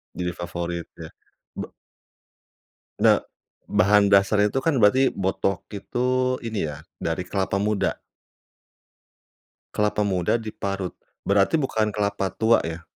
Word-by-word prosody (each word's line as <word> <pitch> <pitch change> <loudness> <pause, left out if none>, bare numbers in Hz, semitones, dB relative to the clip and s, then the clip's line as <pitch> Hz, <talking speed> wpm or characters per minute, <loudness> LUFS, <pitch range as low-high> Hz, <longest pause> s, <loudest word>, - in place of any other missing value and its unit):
Jadi 90 -1 -2
favorit 85 -1 -4
ya. 80 -1 -9 0.5
Ba - - -4 1.3
Ne - - +5 0.5
bahan 100 +1 +4
dasar 100 +1 +4
itu - - -4
kan 155 +4 +1
berarti 130 +6 +4
botok 95 -1 -1
itu, 125 +5 -1
ini 110 -7 -2
ya 75 0 -6 0.2
dari 85 +2 -2
kelapa 100 0 -1
muda? 105 0 0 1.8
Kelapa 105 0 +1
muda 95 +3 +1
diparut, 100 -4 -4 0.3
berarti 100 +10 +3
bukan 110 -6 0
kelapa 100 -2 -1
tua, 115 +1 +3
ya? 80 0 -6
100 Hz, 115 wpm, -24 LUFS, 90-110 Hz, 1.8 s, Ne